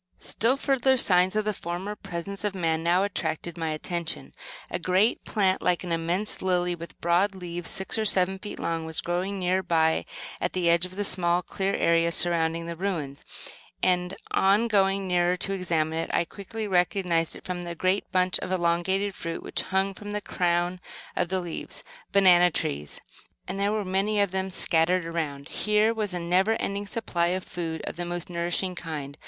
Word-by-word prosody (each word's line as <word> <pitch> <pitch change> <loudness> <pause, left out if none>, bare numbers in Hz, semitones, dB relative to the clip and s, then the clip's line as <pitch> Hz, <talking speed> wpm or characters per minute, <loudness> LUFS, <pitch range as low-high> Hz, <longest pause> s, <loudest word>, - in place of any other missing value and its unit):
Still 245 +5 +2
further 265 -1 +2
signs 185 -3 +4
of 215 -1 +1
the 215 - 0
former 180 +3 -4
presence 195 0 -6
of 205 -2 -1
man 165 -3 0
now 175 +3 +3
attracted 170 -4 -2
my 165 -2 -2
attention. 165 +2 -3 0.4
A 175 - -1
great 185 +6 +2
plant, 190 -3 +2
like 180 0 +1
an 175 - -5
immense 170 +5 -1
lily, 180 -1 +1
with 170 -2 -9
broad 180 +4 +2
leaves 175 -2 -3
six 190 +3 0
or 220 - 0
seven 190 -1 +2
feet 205 +1 -7
long 165 -1 -2
was 160 0 -3
growing 180 +3 -2
near 185 0 +1
by 160 -3 +2 0.4
at - - -1
the 175 -2 +2
edge 170 +1 +2
of 185 - -13
the 205 - -1
small 180 -2 +3
clear 195 0 -1
area 170 0 +3
surrounding 165 -1 +1
the 170 0 -5
ruins; 165 -7 -3 0.6
and, 180 0 +2 0.2
on 205 +4 +3
going 195 -2 +2
nearer 180 0 +2
to 195 +2 -2
examine 165 -4 0
it 165 - -3
I - - +2
quickly 210 +4 -6
recognized 180 -3 +1
it - - -11
from 180 -1 -3
the 170 -1 -5
great 185 +4 0
bunch 185 0 +2
of 185 - -5
elongated 185 +3 +1
fruit 165 -2 -5
which - - -2
hung 190 +1 0
from 205 +2 -8
the 210 - 0
crown 175 -1 0 0.4
of 175 - 0
leaves. 180 -3 -4 0.3
Banana 180 -3 +6
trees! 75 - -3 0.5
And 190 +2 -4
there 200 +1 +2
were 215 -1 -1
many 195 +3 +1
of 200 -2 +2
them 190 0 -1
scattered 180 -1 +2
around. 155 -4 -4
Here 210 +1 +2
was 215 -3 -1
a - - -1
never 180 +5 +2
ending 200 -2 -2
supply 175 -6 -1
of 185 +1 -1
food, 165 -3 -4
of - - -5
the 175 - -3
most 175 0 -5
nourishing 175 +2 -1
kind. 150 -5 -6
180 Hz, 185 wpm, -27 LUFS, 170-195 Hz, 0.6 s, Banana